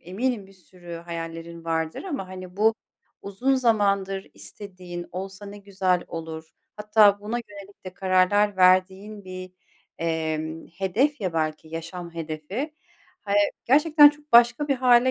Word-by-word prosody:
eminim 205 +4 -2
bir 195 - -18
sürü 180 -2 -12
hayallerin 165 0 -7
vardır 160 -1 -2
ama, 280 - -4
hani, 185 0 -9
bu 220 +2 +4 0.5
uzun 220 +8 0
zamandır 200 -6 +1
istediğin 180 -4 -8
olsa 195 +2 -7
ne 205 +1 -9
güzel 190 -3 0
olur 160 -1 -7 0.3
hatta 210 -1 +4
buna 215 +4 -3
yönelik 200 -1 -13
de 185 - -8
kararlar 190 +2 +2
verdiğin 190 +3 +2
bir, 185 0 -8 0.5
emm, 160 -1 -2
hedef 205 - 0
ya, 185 -4 -2
belki 155 -1 -2
yaşam 170 +1 -7
hedefi. 165 - -5 0.5
Hay 200 -1 -1 0.3
Gerçekten 295 +3 +7
çok 295 0 -20
başka 240 +5 +5
bir 275 - +3
hâle 250 0 +5
190 Hz, 135 wpm, -25 LUFS, 170-215 Hz, 0.5 s, Gerçekten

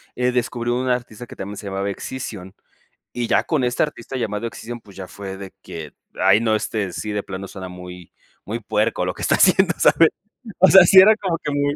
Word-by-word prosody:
eh, 125 0 +1
descubrí 120 -1 -2
un 125 +1 -1
artista 120 -1 -3
que - - -12
también 100 +1 -7
se 100 - -8
llamaba 100 +1 -3
Excision, 100 -3 -7 0.6
y 120 -1 -3
ya - - +2
con 150 -6 0
este 125 0 0
artista 135 -3 -4
llamado 110 -2 -3
Excision, 120 +1 -8
pues 100 -3 -18
ya 95 -2 -8
fue 95 -1 -8
de 95 -1 -9
que: 80 -3 -8 0.2
"Ay, 95 +2 +4
no, 110 -1 +1
este, 105 -3 -2
sí 105 - -5
de 105 - -2
plano 95 0 -7
suena 95 -2 -8
muy 90 -1 -11 0.3
muy 115 +3 -5
puerco 105 -3 -1
lo 90 - -2
que - - -9
está - - +2
haciendo", 185 0 +4
¿sabes? 165 -1 +5 0.5
O 190 0 +7
sea, 190 0 +9
sí 190 +2 +8
era 215 +3 +7
como 180 -5 -2
que 150 - -2
muy 145 0 0
110 Hz, 220 wpm, -21 LUFS, 95-130 Hz, 0.6 s, sea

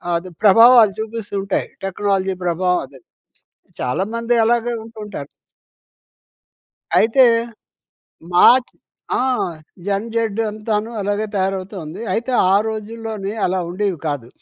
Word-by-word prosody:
అది 180 +2 -3
ప్రభావాలు 225 0 +7
చూపిస్తుంటాయి. 205 -3 -3 0.2
టెక్నాలజీ 195 -1 -1
ప్రభావం 180 +1 +1
అదే. 135 -2 -17 0.8
చాలామంది 230 - -1
అలాగే 240 +1 +1
ఉంటుంటారు. 210 -10 -8 1.7
అయితే, 235 +4 +5 1.1
మాచ్ 245 +8 +5 0.5
ఆ! - - +1 0.6
జన్‌జెడ్డు 225 +2 -1
అంతాను 215 +1 -2
అలాగే 205 +2 -1
తయారవుతూ 190 +1 -2
ఉంది. 165 +8 -8
అయితే, 240 +3 -2 0.2
ఆ - - +5
రోజుల్లోని 220 -2 -5
అలా 185 +1 0
ఉండేవి 190 -2 -2
కాదు. 140 -6 -3
205 Hz, 95 wpm, -19 LUFS, 190-225 Hz, 1.7 s, ప్రభావాలు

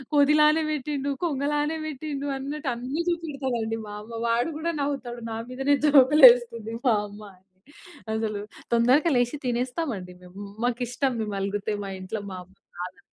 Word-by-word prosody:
కొ‌తి 290 +1 +5
లానే 305 +1 +5
పెట్టిండు, 285 -1 -2
కొంగలానే 295 +1 0
పెట్టిండు" 285 -1 -4
అన్నట్టు 285 +1 -4
అన్ని 255 +7 -3
చూపెడతదండి. 265 -9 -2
మా 205 - -8
అమ్మ 230 +1 -7
వాడు 235 +6 +1
కూడా 335 +1 -1
నవ్వుతాడు. 245 -4 -4
నా 225 - -3
మీదనే 270 +3 +2
జోక్‌లు 285 +1 +6
వేస్తుంది 230 -2 -4
మా 225 - +5
అమ్మ 205 +1 -12
అని. 185 - -28 0.7
అసలు 220 -2 -2 0.3
తొందరగా 255 +8 +4
లేచి, 245 +3 +1
తినేస్తాం 250 +6 -1
అండి 180 -1 -9
మేము. 180 +3 -12 0.2
మాకిష్టం 245 +2 -1
మేము 210 -2 -3
అలుగుతే, 205 +2 -2
మా - - -5
ఇంట్లో 185 +4 -4
మా 185 - -6
అమ్మ 190 - -24 0.3
నాదని. 180 +2 -6
250 Hz, 155 wpm, -26 LUFS, 225-290 Hz, 0.7 s, జోక్‌లు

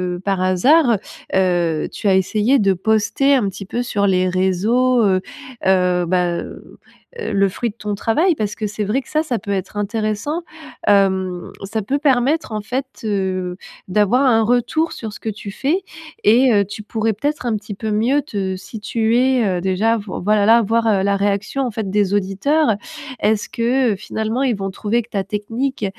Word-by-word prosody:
heu, - - -7
par 195 -2 0
hasard, 235 - +4 0.4
heu, 175 -4 +1
tu - - -4
as 195 - +5
essayé 215 +8 +2
de 195 -3 +3
poster 220 +8 +2
un 240 -7 +1
petit 195 +1 -8
peu 240 +5 -2
sur 205 -4 0
les 185 -1 +2
réseaux, 215 +7 +2
heu 185 -2 +2 0.4
heu, 180 -2 +3
bah, 180 +1 +1
heu, - - -10 0.4
heu, 450 - -3
le 200 0 +3
fruit 235 +5 -3
de 210 - -11
ton 210 -2 -3
travail 315 - +2
parce 210 -5 -3
que 215 - -3
c'est 210 +1 -4
vrai 210 +6 0
que - - -23
ça, 310 +1 +1
ça 250 -8 -2
peut 200 - -6
être 195 +1 -3
intéressant. 215 - -2 0.5
Hem, 190 -3 +2
ça 215 +3 -3
peut 265 +8 -1
permettre 280 +1 +1
en 215 - -2
fait, 255 +6 -3 0.2
heu, 190 -3 -1 0.3
d'avoir 210 +7 +2
un 225 -4 +4
retour 245 +8 +1
sur 220 -3 -6
ce - - -10
que 225 - -3
tu 210 -1 -7
fais 305 - -1 0.4
et, 245 +4 +5
heu, 200 -1 +3
tu 205 +2 -8
pourrais 220 +1 -1
peut-être 285 +6 -3
un 235 -2 0 0.2
peu 220 -1 -2
mieux 240 +7 +2
te 200 -9 -3
situer, 230 +4 0
heu, 180 -2 -1
déjà 190 +5 +1
voi 205 -3 -6
voilà, 210 +1 +3
là, 230 +2 +6
voir 220 -2 +1
la 200 0 +2
réaction, 200 +6 -1
en 245 - -2
fait, 215 -2 -4
des 200 0 +1
auditeurs. 205 +8 +1 0.5
Est-ce 210 0 +1
que, 240 0 +1
heu, - - -3
finalement 220 +5 -3
ils 250 -4 +1
vont 195 0 -3
trouver 220 +5 -1
que 230 - -21
ta 200 -3 -2
technique, 225 +5 -3
215 Hz, 190 wpm, -19 LUFS, 195-245 Hz, 0.5 s, là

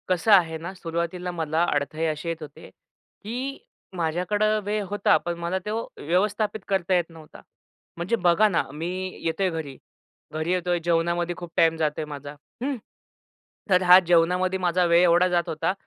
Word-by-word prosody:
कसं 185 +4 +1
आहे 165 -4 +4
ना, 170 +4 -7
सुरुवातीला 170 0 -4
मला 160 -1 -1
अडथळे 150 +3 -1
अशी 155 +2 -3
येत 165 -1 -4
होते, 150 - -11
की 255 +6 -8 0.4
माझ्याकडे 180 +5 0 0.2
वेळ 210 0 -1
होता, 205 +1 +3
पण 175 0 -4
मला 170 +2 -1
तो 215 +2 -2 0.2
व्यवस्थापित 205 +6 0
करता 190 -2 0
येत 175 -1 0
नव्हता. 160 -2 -14 0.6
म्हणजे 175 +7 0
बघा 180 +1 +4
ना 170 - +1
मी 160 +3 -4 0.4
येतोय 185 +4 0
घरी, 155 -6 -6 0.6
घरी 155 +2 -2
येतोय 180 -1 0
जेवणामध्ये 170 +1 0
खूप 175 -2 -8
टाईम 165 0 +4
जातोय 155 -1 -1
माझा, 145 -1 -8 0.3
हं. 280 +1 -1 0.9
तर 185 -1 +4
हा 180 +1 +9
जेवणामध्ये 180 +2 +2
माझा 180 0 +2
वेळ 170 0 +5
एवढा 175 +1 +5
जात 175 -1 0
होता, 160 +3 -1
175 Hz, 160 wpm, -25 LUFS, 165-185 Hz, 0.9 s, हा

